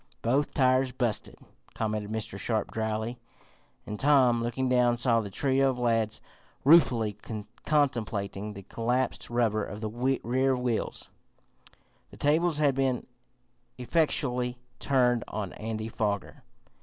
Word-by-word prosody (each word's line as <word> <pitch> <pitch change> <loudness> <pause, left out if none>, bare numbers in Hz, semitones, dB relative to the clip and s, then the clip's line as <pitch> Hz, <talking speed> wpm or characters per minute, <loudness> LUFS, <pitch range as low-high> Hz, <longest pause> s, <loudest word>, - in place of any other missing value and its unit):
"Both 135 +5 +1
tires 130 -1 +3
busted!" 120 -4 -2 0.4
commented 105 -2 -2
Mr. 110 -3 -4
Sharp 110 +2 -1
dryly, 110 +2 -2 0.7
and 105 - -6
Tom, 130 -5 +4
looking 120 +3 -1
down, 125 -1 +3
saw 115 -1 +2
the 105 - -6
trio 135 +6 +2
of 130 - -2
lads 115 -3 0 0.4
ruefully 120 -9 +5 0.5
contemplating 105 -8 0
the 100 -1 -9
collapsed 120 +6 -1
rubber 115 -3 +1
of 105 +2 -6
the 110 -1 -4 0.3
rear 130 +3 +2
wheels. 125 -2 -3 1.0
The - - -14
tables 160 +2 +2
had 145 -2 +3
been 130 -2 0 0.7
effectually 125 -3 0 0.2
turned 125 -4 +2
on 100 -4 -4
Andy 110 0 -4
Foger. 105 -3 -3
120 Hz, 120 wpm, -28 LUFS, 110-130 Hz, 1.0 s, ruefully